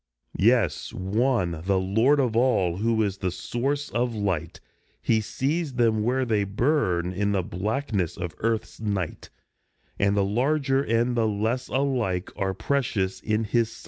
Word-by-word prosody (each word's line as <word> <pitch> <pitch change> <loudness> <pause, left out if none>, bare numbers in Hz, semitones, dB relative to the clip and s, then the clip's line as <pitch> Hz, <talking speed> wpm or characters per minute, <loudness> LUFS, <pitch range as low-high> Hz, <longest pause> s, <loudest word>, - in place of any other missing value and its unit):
Yes, 105 -8 +2
one, 95 -4 0
the 100 0 +2
Lord 110 +10 +3
of 125 -5 +1
all, 105 -8 +2
who 110 +1 +1
is 100 -1 -2
the 95 - 0
source 135 +10 -2
of 120 0 0
Light; 95 -6 -2 0.4
He 110 -1 +2
sees 140 +6 -2
them 115 -3 +2
where 130 +4 +1
they 110 -4 +1
burn 100 - 0
in 100 +2 0
the 95 -2 +1
blackness 100 - -2
of 90 -2 -4
Earth's 115 0 -2
night, 100 -6 -3 0.7
And 100 +1 +2
the 100 - +3
larger 135 +5 +1
and 120 -1 +1
the 115 -2 +2
less 110 +4 -1
alike 125 -10 -1
are 95 -1 -1
precious 110 -4 -1
in 110 +1 0
his 115 +1 +1
sight. - - -13
110 Hz, 155 wpm, -25 LUFS, 95-125 Hz, 0.7 s, Lord